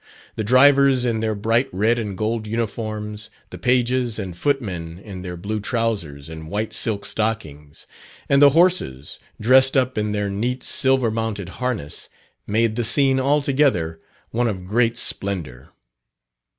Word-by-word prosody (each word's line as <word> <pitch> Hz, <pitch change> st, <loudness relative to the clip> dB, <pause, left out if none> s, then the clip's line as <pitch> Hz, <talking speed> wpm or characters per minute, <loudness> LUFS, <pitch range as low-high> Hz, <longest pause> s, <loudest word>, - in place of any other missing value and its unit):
The 110 Hz, -, -2 dB
drivers 135 Hz, +2 st, +5 dB
in 115 Hz, -2 st, 0 dB
their 110 Hz, -1 st, -1 dB
bright 115 Hz, +5 st, +1 dB
red 110 Hz, +6 st, +1 dB
and 105 Hz, -4 st, -5 dB
gold 110 Hz, +1 st, -2 dB
uniforms, 110 Hz, -1 st, -4 dB, 0.2 s
the -, -, -9 dB
pages 125 Hz, -1 st, +1 dB
and 95 Hz, -5 st, -5 dB
footmen 90 Hz, -, -2 dB
in 95 Hz, -1 st, -9 dB
their 90 Hz, -1 st, -6 dB
blue 105 Hz, +5 st, -4 dB
trousers 105 Hz, -, -2 dB
and 80 Hz, -1 st, -9 dB
white 105 Hz, +3 st, -3 dB
silk 105 Hz, -3 st, +1 dB
stockings, 75 Hz, -10 st, -3 dB, 0.4 s
and 140 Hz, 0 st, +3 dB
the 145 Hz, -, +9 dB
horses 160 Hz, -, +1 dB, 0.2 s
dressed 130 Hz, +4 st, +4 dB
up 130 Hz, -3 st, +1 dB
in 105 Hz, 0 st, -1 dB
their 105 Hz, -1 st, -1 dB
neat, 120 Hz, +6 st, -2 dB
silver 130 Hz, -3 st, +2 dB
mounted 110 Hz, -4 st, -3 dB
harness, 120 Hz, -, -3 dB, 0.4 s
made 110 Hz, +1 st, +1 dB
the 120 Hz, -, 0 dB
scene 135 Hz, +3 st, +3 dB
altogether 135 Hz, -, +1 dB, 0.3 s
one 120 Hz, +1 st, 0 dB
of 95 Hz, -5 st, -4 dB
great 115 Hz, +4 st, +1 dB
splendour. 80 Hz, -, -2 dB
110 Hz, 145 wpm, -21 LUFS, 100-125 Hz, 0.4 s, the